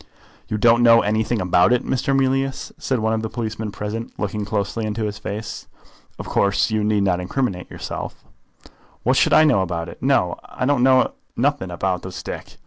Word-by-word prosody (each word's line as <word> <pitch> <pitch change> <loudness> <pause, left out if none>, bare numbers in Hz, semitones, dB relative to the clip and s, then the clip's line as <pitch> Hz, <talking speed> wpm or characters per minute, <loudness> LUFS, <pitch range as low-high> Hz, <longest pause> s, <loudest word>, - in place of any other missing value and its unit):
"You 105 - -2
don't 115 +2 +4
know 115 -1 +7
anything 110 +2 0
about 90 0 +3
it, 125 0 +2
Mr. 135 +1 0
Mealyus?" 135 0 0
said 130 - -1
one 110 0 0
of 110 - 0
the 110 - -3
policemen 110 -2 -4
present, 105 +3 -5
looking 105 0 -3
closely 100 +2 -2
into 105 +1 -3
his 105 0 -3
face. 105 +1 -6 0.5
"Of - - -7
course 100 +3 +1
you 110 -1 +1
need 105 -1 +2
not 90 -1 0
criminate 100 -9 -2
yourself." - - -7 0.8
"What - - +3
should - - +3
I 155 - +7
know 140 -10 +4
about 85 -2 -3
it? - - -12
No; - - +2
I - - -4
know 130 -1 +3 0.2
nothing 95 - 0
about 90 +1 -1
the 95 - -7
stick. - - -7
110 Hz, 185 wpm, -21 LUFS, 100-120 Hz, 0.8 s, know